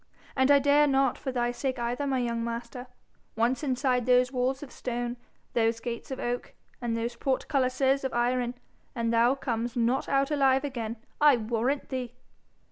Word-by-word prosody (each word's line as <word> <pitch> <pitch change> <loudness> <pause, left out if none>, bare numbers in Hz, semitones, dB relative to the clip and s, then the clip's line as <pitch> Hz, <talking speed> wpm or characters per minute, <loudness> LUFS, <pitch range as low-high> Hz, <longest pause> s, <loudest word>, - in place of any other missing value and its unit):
And 265 0 +3
I 285 - +8
dare 285 +1 +4
not 270 -2 +2
for 265 - -4
thy 240 -1 0
sake 260 +1 -3
either, 245 +4 -2
my 270 -1 +1
young 235 -2 -1
master. 235 +2 -5 0.5
Once 235 +3 +1
inside 255 -3 0
those 250 0 +4
walls 260 +2 -1
of 275 - -10
stone, 240 -1 -3 0.4
those 230 -1 +1
gates 235 0 -5
of 265 - -5
oak, 245 0 -3 0.3
and 235 -1 -1
those 235 +1 -3
portcullises 265 +1 +1
of 265 - -1
iron, 245 0 0 0.4
and 230 -1 0
thou 235 +3 +4
comes 240 -2 -3
not 240 +2 +1
out 275 +1 +2
alive 270 -2 +3
again, 235 -5 -4 0.3
I 295 -4 +7
warrant 235 +5 -1
thee.' 250 -2 -4
250 Hz, 170 wpm, -28 LUFS, 235-270 Hz, 0.5 s, I